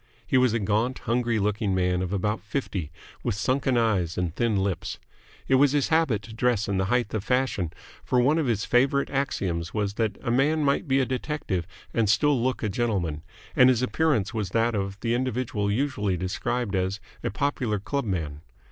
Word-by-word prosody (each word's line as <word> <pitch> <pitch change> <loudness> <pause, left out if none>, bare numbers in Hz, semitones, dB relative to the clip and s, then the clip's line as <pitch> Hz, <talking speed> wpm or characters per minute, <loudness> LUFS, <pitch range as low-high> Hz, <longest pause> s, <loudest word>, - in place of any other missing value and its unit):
He 130 - -1
was 130 -2 +5
a 115 - +1
gaunt, 110 +4 0
hungry 120 -1 +1
looking 105 -1 0
man 90 -1 +1
of 95 -1 -3
about 105 +1 -1
fifty, 100 - -3 0.3
with 120 -5 -1
sunken 130 +3 +1
eyes 100 -8 +1
and 90 -2 -1
thin 115 -3 +1
lips. 95 -3 -1 0.5
It 135 - +4
was 145 -1 +5
his 145 -2 +1
habit 160 -11 +2
to 110 - -10
dress 115 -2 +1
in 100 -1 0
the 95 - +1
height 120 +1 0
of 110 -3 -1
fashion, 125 -10 0 0.3
for 125 - +1
one 145 +6 +3
of 150 - 0
his 110 -3 0
favourite 135 +3 +2
axioms 95 - -2
was 105 -2 0
that 110 -2 -1
a 120 - 0
man 150 +5 +2
might 140 +4 +1
be 135 0 +3
a 130 - +2
detective 125 - -2 0.3
and 115 -3 +2
still 140 +4 +3
look 130 0 -1
a - - +1
gentleman, 95 -9 -1 0.3
and 125 - +7
his 125 -1 +2
appearance 125 -8 +1
was 105 -5 -2
that 115 +4 +1
of 100 -1 -3
the 115 0 0
individual 120 -4 -1
usually 105 -6 0
described 105 +4 -2
as 95 +2 -1 0.2
a - - 0
"popular 130 -6 -1
clubman." 95 - -3
115 Hz, 190 wpm, -26 LUFS, 100-130 Hz, 0.5 s, and